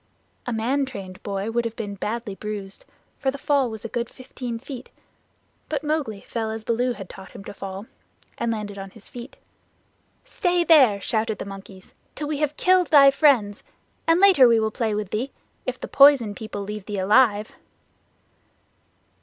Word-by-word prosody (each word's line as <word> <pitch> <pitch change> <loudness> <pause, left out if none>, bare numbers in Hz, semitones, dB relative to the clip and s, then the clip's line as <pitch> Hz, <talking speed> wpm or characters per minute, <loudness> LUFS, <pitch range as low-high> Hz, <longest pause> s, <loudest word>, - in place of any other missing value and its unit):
A - - -1
man 255 +5 0
trained 190 -6 -8
boy 200 +2 -3
would 235 +1 0
have 230 -1 -4
been 205 -3 -5
badly 215 +2 -4
bruised, 200 -1 -7 0.3
for 270 - 0
the 275 - -3
fall 275 -2 +1
was 220 -1 -8
a - - -1
good 235 0 -3
fifteen 250 -2 -7
feet, 260 +1 -9 0.8
but 300 -1 -2
Mowgli 295 -10 -2
fell 225 -2 -4
as 220 0 -5
Baloo 245 +2 0
had 195 -5 -9
taught 190 +1 -12
him - - -10
to - - -8
fall, 195 +1 -7 0.5
and 235 - -1
landed 205 -2 -5
on 195 0 -7
his 200 +1 -14
feet. 245 +2 -10 0.9
"Stay 355 -7 +1
there," 270 -11 +6
shouted 220 +1 -1
the - - -6
monkeys, 195 -1 -11 0.2
"till 300 - -4
we 300 -1 -2
have 300 -1 -1
killed 365 -1 +4
thy 280 -2 +7
friends, 255 -9 +3 0.5
and 330 +1 +4
later 370 -10 +7
we 230 -1 +4
will 220 0 0
play 220 -2 -1
with 210 -2 -4
thee 250 +6 -2 0.4
if 255 -1 -3
the - - -6
Poison 275 -7 +6
People 205 -1 -6
leave 210 0 -7
thee 205 -1 -3
alive." 210 +2 +3
230 Hz, 180 wpm, -24 LUFS, 205-275 Hz, 0.9 s, thy